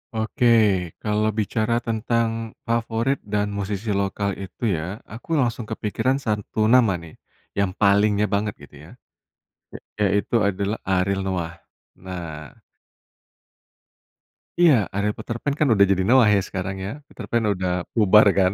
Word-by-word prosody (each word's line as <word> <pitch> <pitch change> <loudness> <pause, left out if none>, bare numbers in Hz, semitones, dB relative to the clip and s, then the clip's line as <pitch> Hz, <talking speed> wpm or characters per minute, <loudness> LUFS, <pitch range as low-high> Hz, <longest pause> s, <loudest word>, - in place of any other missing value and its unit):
Oke, 110 +2 0 0.6
kalau 105 0 0
bicara 115 +2 0
tentang 115 0 -1
favorit 115 +2 -1
dan 105 0 0
musisi 100 +1 -3
lokal 100 0 -1
itu 95 +4 -9
ya, 90 +7 -6
aku 120 +9 -5
langsung 120 -5 0
kepikiran 110 +4 -1
satu 110 -4 -2
nama 115 -3 +4
nih, 85 -2 -11 0.4
yang 100 -1 0
palingnya 100 +1 +3
banget 105 +1 0
gitu - - -15
ya, - - -15 1.1
ya 105 - +2
yaitu 100 +3 0
adalah 100 +2 -1
Ariel 95 +1 0
Noah. 85 -3 -3 0.4
Nah 85 -6 -8 2.0
iya, 150 - +4
Ariel 100 +2 -1
Peterpan 120 +6 -4
kan 150 0 +1
udah 100 -3 +5
jadi 95 -1 +1
Noah 120 +5 +5
ya, 100 - +3
sekarang 95 0 -5
ya, 100 - -4
Peterpan 115 -4 -1
udah 90 -1 -2
bubar 105 -1 +6
kan. 95 -2 +3
105 Hz, 135 wpm, -23 LUFS, 95-115 Hz, 2.0 s, bubar